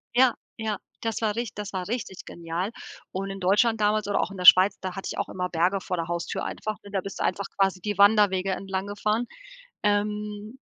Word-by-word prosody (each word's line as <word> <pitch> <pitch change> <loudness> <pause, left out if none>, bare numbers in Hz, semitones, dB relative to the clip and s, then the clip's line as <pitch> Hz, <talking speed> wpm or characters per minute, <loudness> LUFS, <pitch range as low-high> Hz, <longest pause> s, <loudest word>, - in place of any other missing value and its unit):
Ja, 255 -1 +6 0.2
ja 220 -3 -2 0.2
das 225 -1 -2
war 210 -2 0
rich 235 -2 -3
das 205 -1 -6
war 185 -1 -3
richtig 220 -5 -4
genial. 170 +5 -4 0.4
Und 195 +1 -3
in 195 0 -6
Deutschland 210 +5 +3
damals 210 0 +2
oder 205 - +1
auch - - -2
in 195 - -8
der 180 - -4
Schweiz, 185 +3 +8
da 185 -1 -4
hatte 195 - -5
ich - - -6
auch - - -2
immer 180 -1 -3
Berge 180 +4 +1
vor 180 - -3
der 165 -1 -2
Haustür 170 0 -3
einfach, 215 -1 -4
ne, 200 - -11
da 195 -2 0
bist 195 +1 -7
du - - 0
einfach 200 - 0
quasi 195 -2 +2
die 205 -1 -3
Wanderwege 200 -2 +5
entlanggefahren. 200 +4 -2 0.6
Ähm, 210 +3 -1
200 Hz, 210 wpm, -26 LUFS, 185-210 Hz, 0.6 s, Schweiz